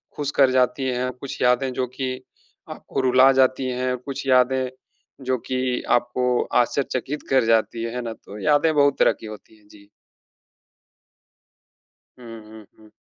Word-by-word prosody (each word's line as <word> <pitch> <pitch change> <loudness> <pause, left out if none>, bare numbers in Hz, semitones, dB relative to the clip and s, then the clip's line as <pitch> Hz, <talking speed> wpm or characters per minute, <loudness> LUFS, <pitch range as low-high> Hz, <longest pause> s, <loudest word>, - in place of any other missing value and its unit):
खुश 145 -1 -3
कर 135 -2 +6
जाती 130 +1 +1
हैं, 125 0 -1
कुछ 130 +2 -9
यादें 125 +1 +2
जो 125 0 -2
कि 130 -1 -3 0.6
आपको - - -5
रुला 130 +1 +5
जाती 130 0 +2
हैं, 125 0 -2
कुछ 135 +2 -7
यादें 130 0 +3 0.6
जो 130 0 0
कि 130 -1 -1 0.2
आपको 120 +1 -2 0.3
आश्चर्यचकित 135 +2 -3
कर 130 -3 +3
जाती 115 0 +1
है, 115 +1 -5
है 125 - -3
ना? 115 -1 -5
तो 105 -1 -12
यादें 150 +1 +3
बहुत 140 -1 +3
तरह - - +4
की - - -9
होती 110 0 -11
हैं। 105 -1 -26
जी। 100 -1 -19 2.3
हुँ, 115 -2 -10
हुँ, 110 -1 -13
हुँ। 110 -1 -19
125 Hz, 155 wpm, -22 LUFS, 115-130 Hz, 2.3 s, कर